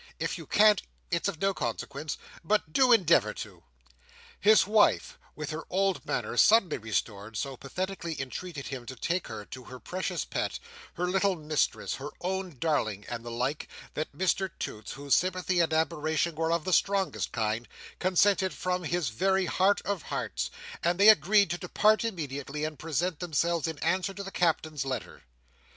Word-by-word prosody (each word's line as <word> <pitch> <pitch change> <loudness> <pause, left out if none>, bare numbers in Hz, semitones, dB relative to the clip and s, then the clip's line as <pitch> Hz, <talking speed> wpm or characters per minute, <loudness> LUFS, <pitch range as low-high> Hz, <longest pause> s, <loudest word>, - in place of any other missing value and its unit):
If - - -2
you - - -10
can't, 210 -2 +5 0.3
it's 170 +2 +1
of 190 -6 -3
no 195 0 +2
consequence—but 155 +4 -3
do 255 +3 +5
endeavour 185 -8 +4
to!" - - -8 0.8
His 215 +2 +6
wife, 210 +1 +3 0.2
with 150 0 -5
her 155 +1 -4
old 195 0 +1
manner - - -2
suddenly 215 -7 +5
restored, 110 0 -3
so 135 +3 -3
pathetically 170 +4 -4
entreated 140 +3 -5
him 125 -3 -6
to 130 - -6
take 170 +9 -1
her 105 - -7
to 130 +2 -10
her 130 0 -10
precious 185 +7 -3
pet, - - -2 0.4
her 180 - -1
little 190 +1 +2
mistress, 155 -2 -1
her 140 +2 -6
own 185 -4 -3
darling, 110 -10 0
and 115 -1 -5
the 120 - -6
like, 125 +5 -2 0.3
that 155 - -3
Mr 190 +4 0
Toots, 105 -1 -5
whose 140 0 -1
sympathy 185 0 +2
and 165 -2 +3
admiration 160 +1 +1
were 160 +1 -1
of 170 -1 +1
the 185 - 0
strongest 195 0 +1
kind, 115 +1 -1 0.3
consented 185 -1 +3
from 180 +4 -1
his 170 -5 0
very 190 - +1
heart 190 +3 +2
of 200 -4 -2
hearts; 60 - -3 0.3
and 175 +2 +1
they 205 +2 +9
agreed 205 -3 +5
to 175 - -2
depart 210 +4 +3
immediately, 150 - -4
and 155 -1 -4
present 165 +1 -1
themselves 170 -1 0
in 160 -2 -4
answer 185 +3 0
to 200 - -5
the 195 - -7
Captain's 160 -5 0
letter. 135 - -5
170 Hz, 170 wpm, -29 LUFS, 140-190 Hz, 0.8 s, they